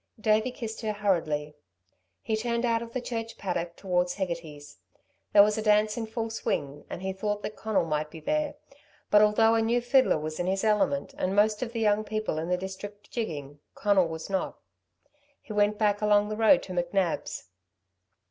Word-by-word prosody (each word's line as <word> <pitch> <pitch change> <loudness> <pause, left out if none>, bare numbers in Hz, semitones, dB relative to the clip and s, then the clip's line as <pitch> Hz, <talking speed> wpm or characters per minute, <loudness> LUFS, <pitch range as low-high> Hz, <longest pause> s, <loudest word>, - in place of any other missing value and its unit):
Davey 215 +2 +2
kissed 225 -3 -6
her 215 -2 -1
hurriedly. 160 -8 0 0.7
He 220 - 0
turned 235 +2 -1
out 230 -1 +1
of 230 0 -7
the 255 - -3
church 230 -2 -5
paddock 170 -3 -3
towards 180 -2 0
Hegarty's. 165 -6 -5 0.5
There 200 - +8
was 210 +1 +1
a - - -1
dance 210 0 +3
in 225 -2 -4
full 225 0 -3
swing, 145 -9 -3
and 180 - -6
he 190 0 -2
thought 205 +1 -3
that 215 - -5
Conal 220 -5 0
might 150 -1 -1
be 160 - -10
there. 300 - -1 0.6
But 210 - +7
although 215 +2 +5
a 225 - +3
new 230 +2 +2
fiddler 250 - +3
was 155 +1 -5
in 175 - -1
his 190 +2 0
element 200 -10 +1
and 185 +1 0
most 210 +1 +3
of 245 -2 -3
the 235 - -4
young 210 0 +3
people 215 -6 -2
in 165 +2 -4
the 180 - +2
district 200 +2 -8
jigging, 145 - -4 0.2
Conal 200 -4 +3
was 160 0 -6
not. 190 -1 -2 0.8
He 215 - -9
went 210 0 +2
back 205 -1 +1
along 210 0 +3
the 215 - -2
road 225 +6 +5
to 185 - -7
McNab's. 175 - -1
210 Hz, 190 wpm, -28 LUFS, 175-220 Hz, 0.8 s, There